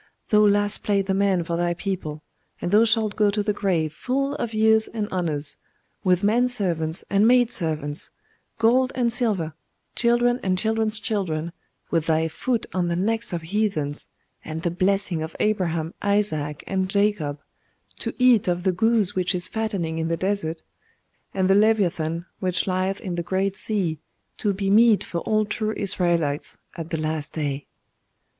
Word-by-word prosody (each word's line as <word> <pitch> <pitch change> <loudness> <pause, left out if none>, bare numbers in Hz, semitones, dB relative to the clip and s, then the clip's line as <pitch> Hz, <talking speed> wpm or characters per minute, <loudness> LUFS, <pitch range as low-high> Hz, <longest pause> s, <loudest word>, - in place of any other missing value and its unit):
Thou 210 - +5
Last 205 0 +2
played 200 -2 +1
the 195 - 0
man 195 -2 +2
for 170 +1 -3
thy 175 0 0
people; 165 -5 -4 0.4
and 175 - -3
thou 215 +3 +6
shalt 220 -2 +1
go 210 -1 +3
to 205 +1 -1
the 210 0 0
grave 175 -7 0
full 275 - -1
of 230 - -3
years 220 0 +3
and 215 -2 -3
honours, 155 -6 -2 0.5
with 185 -1 +2
men 235 +5 +3
servants 175 -8 0
and 200 +2 +4
maid 245 -1 +4
servants, 155 -4 -1 0.5
gold 250 +3 +3
and 240 -2 +2
silver, 205 - 0 0.4
children 240 +1 +2
and 185 -1 0
children's 220 +1 +1
children, 175 -7 -2 0.4
with 165 -2 +1
thy 160 0 +2
foot 230 +8 -2
on 180 -2 0
the 170 - 0
necks 225 +6 -1
of 170 -2 -3
heathens, 165 -6 -1 0.4
and 160 +1 -6
the 175 - 0
blessing 185 -1 +1
of 160 +1 -5
Abraham, 170 -6 0
Isaac, 160 -8 0
and 190 -1 -1
Jacob, 200 -8 0 0.6
to - - -4
eat 250 -6 +4
of 175 0 0
the 190 - +3
goose 220 +1 +2
which 185 0 0
is 175 - -2
fattening 195 -8 -2
in 160 - -1
the 165 0 -1
desert, 185 -4 -2 0.7
and 190 -1 0
the 195 - +5
Leviathan 175 -6 +2
which 185 -2 0
lieth 185 +1 -1
in 185 - -4
the 170 - -2
great 190 +3 -1
sea, 185 -9 -1 0.4
to 205 - 0
be 195 0 -3
meat 220 0 +5
for 170 - -4
all 215 +4 +1
true 215 +1 -2
Israelites 175 -7 0 0.2
at 165 -2 -6
the 165 - -2
last 155 -1 -3
day. 145 -3 -3
190 Hz, 170 wpm, -24 LUFS, 165-215 Hz, 0.7 s, thou